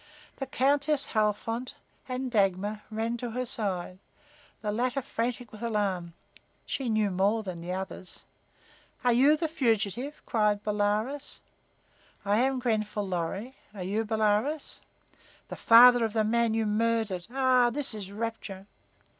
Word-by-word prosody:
The 270 - -4
Countess 280 +2 +2
Halfont 225 +4 -1 0.3
and 255 0 -3
Dagmar 205 0 +1
ran 225 +2 -2
to 240 0 -4
her 250 +2 -3
side, 190 -5 -4 0.6
the 210 - -1
latter 250 +5 0
frantic 240 0 -3
with 215 - -12
alarm. 200 -7 -1 0.5
She 265 -3 -3
knew 215 -2 +1
more 200 +4 +1
than 180 -4 -6
the 175 +2 -4
others. 190 -1 -6 0.8
"Are 245 -1 +4
you 280 +6 +5
the 325 +1 -1
fugitive?" 245 - -1
cried 210 -3 +1
Bolaroz. 210 +7 -1 0.8
I 205 +2 +2
am 265 +1 +2
Grenfall 215 -4 -1
Lorry. 190 +8 -3 0.2
Are 190 - -5
you 205 +5 -1
Bolaroz?' 220 +7 0 0.7
"The - - -5
father 245 +1 +7
of 220 -2 -1
the 220 -1 +2
man 230 +1 +1
you 225 -1 +1
murdered. 215 -4 0
Ah, 255 -1 +3
this 275 0 -3
is 200 -3 -7
rapture!" 210 -3 -5
225 Hz, 140 wpm, -28 LUFS, 205-250 Hz, 0.8 s, father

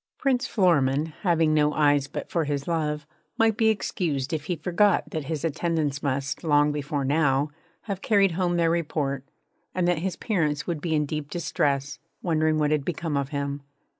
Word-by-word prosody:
Prince 260 -2 +1
Florimond, 155 - +2
having 165 -4 +3
no 150 -1 +3
eyes 145 -2 +3
but - - -6
for 165 -3 0
his 140 -1 -2
love, 150 -3 -1 0.3
might 225 -2 +3
be 225 -1 +3
excused 165 -9 -1
if 150 -2 -2
he 180 - -1
forgot 180 +5 +2
that 155 -3 -3
his 155 +1 -3
attendants 155 -3 -1
must, 135 +1 -2
long 150 -2 +4
before 145 -1 -2
now, 145 0 +2 0.3
have 195 -3 -5
carried 200 -3 +3
home 175 0 0
their 165 -1 +3
report, 145 -5 -1 0.5
and 180 -1 +1
that 175 -3 +2
his 185 +2 -2
parents 155 -9 -1
would 165 -4 -3
be 160 -2 0
in 150 -1 +2
deep 150 0 -4
distress, 145 -4 -1 0.2
wondering 155 -2 +2
what 150 -1 +1
had 150 -2 +1
become 160 -1 -3
of 140 -1 -1
him. 140 -1 -3
155 Hz, 180 wpm, -26 LUFS, 145-175 Hz, 0.5 s, long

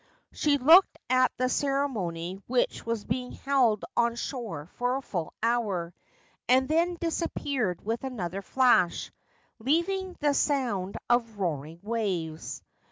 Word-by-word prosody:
She 290 -2 +2
looked 325 +8 +6
at 255 0 +4
the 255 - +1
ceremony 205 -11 -1
which 250 0 0
was 230 -2 -2
being 250 +2 -3
held 255 -7 +2
on 235 0 +2
shore 225 - -5
for 245 +1 +1
a 270 - -2
full 175 -9 -4
hour, 205 -8 0 0.6
and 260 +1 +5
then 340 +3 +1
disappeared 280 - -2
with 230 +3 -2
another 195 -8 -4
flash, 240 -6 +2 0.5
leaving 355 - 0
the 290 -1 +2
sound 240 -11 0
of 235 -3 +1
roaring 165 -3 -3
waves. 190 -8 -3
240 Hz, 125 wpm, -28 LUFS, 190-275 Hz, 0.6 s, looked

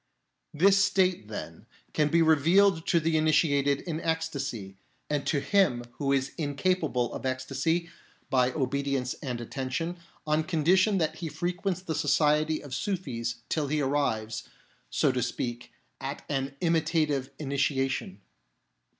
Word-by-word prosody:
This 195 +5 +5
state, 185 - +2
then, 110 - -8 0.3
can 150 - +2
be 165 +2 +4
revealed 165 +3 +4
to 170 - +4
the 160 0 +1
initiated 145 -3 +3
in 165 -2 -4
ecstasy, 140 - -3 0.4
and 145 -2 -1
to 145 - +2
him 145 -5 +2 0.2
who 140 -2 0
is 135 0 +1
incapable 145 -4 0
of - - -6
ecstasy, 135 +6 -1 0.4
by 125 -1 +3
obedience 140 -2 -1
and 125 -5 -3
attention, 135 +8 -3 0.3
on 155 +1 +2
condition 185 +5 +3
that 160 -4 0
he 170 - -4
frequents 175 +4 -2
the 165 - -3
society 155 0 +2
of 140 -3 -8
Sufis 120 - -3
till 155 -3 -1
he 150 +2 0
arrives, 115 -6 -1 0.4
so - - +2
to 125 -1 -1
speak, 120 0 -3 0.3
at - - -5
an 135 -1 -2
imitative 155 -5 +1
initiation. 140 -2 -1
150 Hz, 135 wpm, -28 LUFS, 135-165 Hz, 0.4 s, This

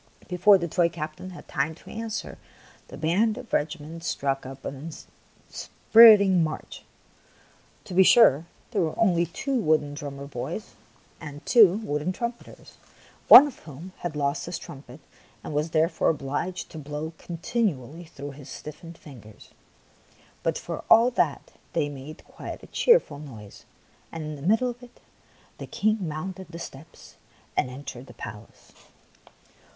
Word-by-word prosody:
Before 185 +3 +5
the 170 -2 -3
toy 170 +1 +2
captain 155 +2 -7
had 180 - -12
time 150 +3 -1
to - - -16
answer, 225 0 -5 0.5
the - - -10
band 205 +8 +1
of 255 -2 -10
the - - +2
regiment 160 +2 -3
struck 135 -5 -2
up 135 0 -10
an 140 +4 -6 0.6
inspirit 225 -2 +7
ing 190 -4 +3
march. 155 -1 -5 1.0
To 190 - -9
be 185 - +6
sure, 170 - +6 0.2
there 210 -5 0
were 160 -2 -2
only 175 -6 +3
two 270 - -4
wooden 155 -6 +1
drummer 140 -1 -7
boys 140 - -6 0.5
and 145 -2 -9
two 220 -8 +7
wooden 150 0 -2
trum 235 +5 -2
peters, 235 - -17 0.5
of 280 0 +9
whom 150 -4 -12
one 180 +5 -10
had 175 -3 -4
lost 140 +1 -1
his 175 -1 -4
trumpet 135 0 -12 0.4
and - - -6
was 150 +2 0
therefore 160 +2 +2
obliged 150 +4 -3
to 160 - -8
blow 150 +2 -6
continually 170 - -3
through 145 -2 -9
his 140 0 -12
stiffened 165 +4 -10
fingers; 110 -8 -14 0.9
but - - -1
for - - -6
all 230 +2 +7
that 240 - -1 0.2
they 145 - 0
made 145 +2 -10
quite - - -9
a - - -15
cheerful 470 - +3
noise, 110 -9 -12 0.5
and 165 -1 -6
in 155 0 -5
the 140 - -11
middle 225 - +2
of 240 +1 -14
it 245 0 -16 0.6
the - - -7
King 215 +1 0
mounted 185 +5 -6
the 170 - -8
steps 155 -3 -11 0.4
and 125 - +1
entered 130 -1 -9
the 120 - -14
palace. 105 -1 -11
160 Hz, 155 wpm, -26 LUFS, 145-190 Hz, 1.0 s, of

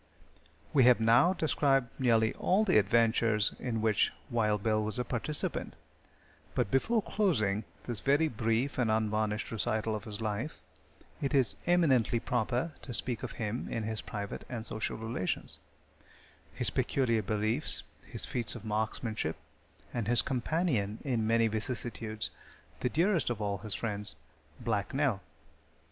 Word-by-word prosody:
We 135 -4 +6
have 125 -2 +6
now 115 +11 +5
described 140 -7 +2
nearly 115 -3 +3
all 200 +4 +2
the 185 - +5
adventures 110 0 +3
in 115 -3 -2
which 110 -2 +3 0.2
Wild 105 -3 +1
Bill 110 -1 +2
was 110 +3 -2
a 125 - -1
participant, 145 +5 -2 0.8
but 95 - 0
before 220 - +2
closing 110 - +1 0.2
this 120 -4 -2
very 145 +6 +3
brief 115 +2 -1
and 120 -3 +2
unvarnished 110 -1 0
recital 110 -1 -1
of 105 - -6
his 105 -2 -6
life, 110 +6 -3 0.6
it 140 +1 0
is 130 -4 +3
eminently 135 -10 +3
proper 120 +6 -1
to 125 - -5
speak 120 0 -1
of - - -5
him 110 +1 -3
in 115 - -2
his 110 0 -2
private 100 -1 -5
and 115 -3 -5
social 110 -1 -3
relations; 110 -4 -3 0.9
his - - -2
peculiar 115 -5 +1
beliefs; 110 +7 +3 0.2
his - - -1
feats 120 -2 0
of 115 -2 -9
marksmanship, 110 -4 -2 0.6
and 115 -4 -2
his 120 +1 +4
companion 125 - 0
in 120 -6 0
many 115 0 +4
vicissitudes 110 0 -3 0.5
the 125 - 0
dearest 170 +3 +2
of 120 -3 -2
all 100 -2 -2
his 105 -2 -2
friends 105 -5 -2 0.4
Black 105 +1 -2
Nell. 135 -9 +1
115 Hz, 145 wpm, -31 LUFS, 110-130 Hz, 0.9 s, We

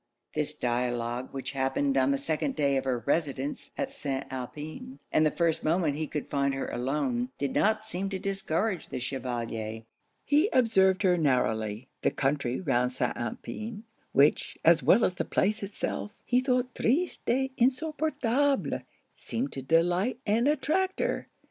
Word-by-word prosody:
This 150 0 -2
dialogue, 120 -1 -1
which 135 -1 -4
happened 135 0 0
on 130 0 +3
the 140 - +2
second 155 - -1
day 140 -2 +2
of 135 - 0
her 125 -3 -1
residence 140 -2 -1
at - - -2
St. 135 -2 -3
Alpin, 150 - -6
and 155 - +4
the 155 - +5
first 165 0 0
moment 160 -1 +2
he 155 +1 -2
could 150 - -4
find 140 -1 0
her 135 - -2
alone, 125 -1 -1
did 140 -2 -2
not 215 +1 +2
seem 195 -2 -3
to 195 - -2
discourage 195 -1 -1
the - - -4
Chevalier. 115 -4 -4 0.4
He 300 +8 +4
observed 190 -6 +4
her 180 -2 +4
narrowly: 110 -5 +1
the - - +3
country 140 -2 0
round 125 -7 +1
St. 130 - -1
Alpin, 215 - -5 0.3
which, 145 +2 +3
as 165 -1 +6
well 180 - +5
as - - 0
the 180 - -2
place 210 +3 +1
itself, 205 +1 -4
he 250 - +3
thought 255 -1 0
'triste 315 +10 0
et 265 +2 +2
insupportable,' 280 0 +1 0.3
seemed 250 +5 -3
to 135 - -5
delight 175 - +2
and 225 +5 +2
attract 310 +6 +1
her. - - -1
155 Hz, 160 wpm, -29 LUFS, 135-220 Hz, 0.4 s, as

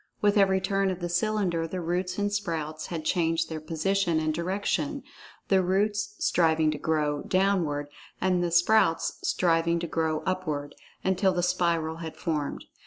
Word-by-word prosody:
With 205 0 +3
every 195 -2 +4
turn 195 +1 0
of 185 -1 -3
the 175 -1 -3
cylinder 175 -3 0
the 185 +3 -4
roots 180 +2 -2
and 205 0 0
sprouts 160 -6 -3
had 160 -3 -5
changed 165 -2 +1
their 160 -1 -4
position 170 +2 0
and 155 0 0
direction—the 200 - -2
roots 205 +3 0
striving 160 -2 +2
to 155 - -5
grow 150 -2 0
"downward," 185 -7 +1 0.3
and 180 -1 +1
the 175 - 0
sprouts 175 0 +3
striving 170 -1 +2
to 170 - -3
grow 160 -2 -1
"upward"—until 185 +2 -2
the 175 -1 -1
spiral 170 -3 0
had 165 -1 -7
formed. 150 -4 -3
175 Hz, 150 wpm, -27 LUFS, 160-195 Hz, 0.3 s, every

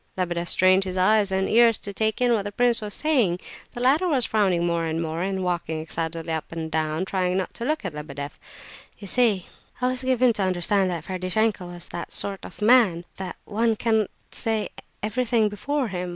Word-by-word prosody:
Lebedeff 175 -1 -2
strained 185 +1 +4
his 185 -1 -4
eyes 200 +2 +3
and 190 0 +1
ears 230 0 +5
to 200 - -6
take 220 +1 0
in 245 -1 +4
what 220 - +2
the 205 +1 -5
prince 240 +2 +2
was 210 -1 -5
saying. 245 - +1 0.3
The 240 - -6
latter 290 +8 +3
was 270 -8 +2
frowning 190 -5 +1
more 170 -1 0
and 160 0 -2
more, 165 0 -3
and 190 0 -1
walking 170 -3 -2
excitedly 165 +1 -4
up 160 - -4
and 160 -1 -5
down, 155 +2 -1
trying 185 -1 0
not 190 - -2
to 235 - -5
look 305 -4 -1
at 180 - -3
Lebedeff. 150 -1 -7 0.6
"You 205 - -10
see," 235 +4 +4
he - - -10 0.4
said, 250 - 0
"I - - +3
was 255 0 -2
given 255 -2 +3
to 210 - -2
understand 185 +1 +1
that 170 -3 -4
Ferdishenko 185 +1 -1
was 175 -1 -8
that 170 - -6
sort 195 -1 -1
of 195 - -8
man,—that 190 -6 +2
one 225 +1 +1
can't 220 -2 +1 0.2
say 220 -2 0 0.3
everything 225 0 +1
before 260 +5 -2
him. 180 -1 -4
195 Hz, 205 wpm, -24 LUFS, 175-225 Hz, 0.6 s, ears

